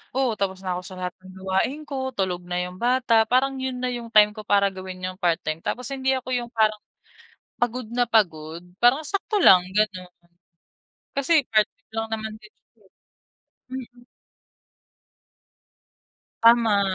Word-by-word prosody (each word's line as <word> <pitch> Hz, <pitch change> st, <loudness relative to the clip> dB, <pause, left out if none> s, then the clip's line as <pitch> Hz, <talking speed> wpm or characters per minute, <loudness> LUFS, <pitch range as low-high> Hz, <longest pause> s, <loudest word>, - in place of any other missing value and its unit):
oo, 265 Hz, -3 st, +2 dB
tapos 190 Hz, -1 st, -2 dB
na 180 Hz, -2 st, -2 dB
ako -, -, -5 dB
sa 190 Hz, -, -9 dB
lahat 180 Hz, -1 st, -3 dB
ng 185 Hz, -, -12 dB
gawain 190 Hz, +10 st, -1 dB
ko, 265 Hz, -3 st, -4 dB
tulog 180 Hz, -4 st, -2 dB
na 180 Hz, 0 st, -3 dB
yung 180 Hz, 0 st, -6 dB
bata, 240 Hz, -1 st, +3 dB
parang 265 Hz, +3 st, +1 dB
yun 260 Hz, -1 st, -4 dB
na 250 Hz, -, 0 dB
yung 235 Hz, -2 st, -6 dB
time 210 Hz, -1 st, +7 dB
ko 215 Hz, -, -8 dB
para 200 Hz, -1 st, +3 dB
gawin 185 Hz, -1 st, -9 dB
yung 185 Hz, 0 st, -5 dB
part 175 Hz, -3 st, +1 dB
time, 155 Hz, +1 st, -3 dB
tapos 250 Hz, 0 st, -3 dB
hindi 265 Hz, -1 st, 0 dB
ako 260 Hz, -1 st, -4 dB
yung 240 Hz, -1 st, -2 dB
parang 215 Hz, -1 st, +2 dB, 0.8 s
pagod 245 Hz, +1 st, -1 dB
na 245 Hz, 0 st, +2 dB
pagod. 170 Hz, -6 st, 0 dB, 0.2 s
Parang 250 Hz, +6 st, +4 dB
sakto 400 Hz, +6 st, -2 dB
lang 185 Hz, -, +8 dB, 0.2 s
gano'n. 185 Hz, -4 st, 0 dB, 1.1 s
Kasi 280 Hz, 0 st, +3 dB
part-time 215 Hz, 0 st, 0 dB
lang 225 Hz, 0 st, -1 dB
naman 220 Hz, 0 st, -6 dB
din, 215 Hz, 0 st, -17 dB
eh. -, -, -49 dB, 1.1 s
Mm. 245 Hz, -2 st, -8 dB, 2.4 s
Tama. 230 Hz, -3 st, +5 dB
220 Hz, 155 wpm, -24 LUFS, 190-250 Hz, 2.4 s, lang